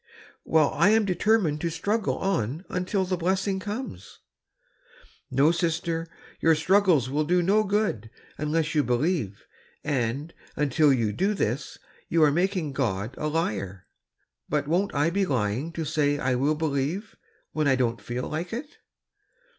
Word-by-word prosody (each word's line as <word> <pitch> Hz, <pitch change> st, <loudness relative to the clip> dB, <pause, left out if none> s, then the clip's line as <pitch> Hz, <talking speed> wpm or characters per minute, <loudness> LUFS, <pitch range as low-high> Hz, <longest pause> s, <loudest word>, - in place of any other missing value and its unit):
*^ -, -, -52 dB, 0.4 s
" -, -, -49 dB
Well, 155 Hz, -2 st, +3 dB
I 200 Hz, -, +4 dB
am 220 Hz, 0 st, +4 dB
determined 185 Hz, -5 st, +1 dB
to 170 Hz, -, 0 dB
struggle 205 Hz, +6 st, -1 dB
on 165 Hz, -, -1 dB, 0.2 s
till 195 Hz, -2 st, +1 dB
the 185 Hz, 0 st, -1 dB
blessing 190 Hz, +3 st, 0 dB
comes.'^ 205 Hz, -, -6 dB, 1.1 s
"No, 140 Hz, +5 st, +4 dB
sister, 165 Hz, -1 st, -1 dB, 0.3 s
your 165 Hz, -1 st, +4 dB
struggles 180 Hz, -, +3 dB
will 145 Hz, +4 st, 0 dB
do 175 Hz, +3 st, +2 dB
no 205 Hz, +4 st, +3 dB
good 200 Hz, -, -1 dB, 0.3 s
unless 155 Hz, +1 st, -1 dB
you 150 Hz, -2 st, +3 dB
believe; 125 Hz, -, -1 dB, 0.4 s
and, 140 Hz, +2 st, -2 dB, 0.2 s
until 150 Hz, +1 st, +3 dB
you 115 Hz, -5 st, +1 dB
do 200 Hz, -, 0 dB
this, 130 Hz, -, -2 dB, 0.3 s
you 165 Hz, -1 st, +3 dB
are 150 Hz, -, +5 dB
making 175 Hz, -2 st, 0 dB
God 110 Hz, -4 st, -1 dB
a 150 Hz, -, -3 dB
liar.'' 100 Hz, -, -2 dB, 0.6 s
"But 145 Hz, -1 st, 0 dB
won't 185 Hz, +5 st, 0 dB
I 145 Hz, +4 st, +2 dB
be 200 Hz, +2 st, +1 dB
lying 125 Hz, -, -1 dB
to 160 Hz, 0 st, -3 dB
say 145 Hz, -1 st, +1 dB
I 130 Hz, -2 st, 0 dB
will 140 Hz, +5 st, +1 dB
believe, 155 Hz, +6 st, -2 dB, 0.4 s
when 155 Hz, -2 st, 0 dB
I 135 Hz, -, +4 dB
dcMi't 120 Hz, -4 st, 0 dB
feel 120 Hz, +4 st, -4 dB
like 165 Hz, +3 st, -4 dB
it?" 285 Hz, +6 st, -6 dB
155 Hz, 155 wpm, -26 LUFS, 135-185 Hz, 1.1 s, are